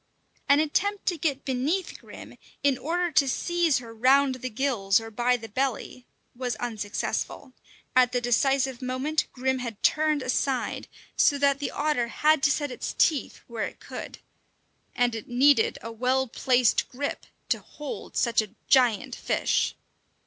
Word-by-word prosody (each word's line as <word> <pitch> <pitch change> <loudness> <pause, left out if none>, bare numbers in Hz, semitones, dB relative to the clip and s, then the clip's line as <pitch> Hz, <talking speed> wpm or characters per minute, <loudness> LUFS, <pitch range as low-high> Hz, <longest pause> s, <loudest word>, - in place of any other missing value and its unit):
An 280 +1 +6
attempt 395 +7 0
to 350 - 0
get 280 -3 -1
beneath 285 +8 -1
Grim, - - -12 0.3
in 280 -2 +3
order 345 +5 -1
to 280 -3 +3
seize 345 +1 +1
her 235 -3 -8
round 265 +4 +4
the 255 0 -5
gills 215 -5 +1
or 225 0 -9
by 245 +3 +1
the 225 -1 -9
belly, 255 +1 -3 0.3
was 245 -2 -3
unsuccessful; 225 +3 -4 0.4
at 250 -1 +5
the 250 - +1
decisive 260 +2 +1
moment 260 +5 -1
Grim 260 0 -1
had 235 -4 -6
turned 305 -2 +2
aside, 255 0 -1 0.3
so 285 - +4
that 280 0 +2
the 285 - -2
otter 290 -5 0
had 305 +5 +2
to 275 - +4
set 290 -1 -1
its - - -5
teeth 305 -4 +1
where 230 -2 -3
it - - -13
could. - - -8 0.8
And 245 -1 +2
it 225 -2 -6
needed 255 0 +4
a 230 - -6
well 255 +3 +1
placed 250 -1 +2
grip 285 +3 -4 0.2
to - - +1
hold 295 -2 -8
such 235 -2 +3
a 215 0 -10
giant 250 -1 +3
fish. - - 0
260 Hz, 155 wpm, -26 LUFS, 240-285 Hz, 0.8 s, An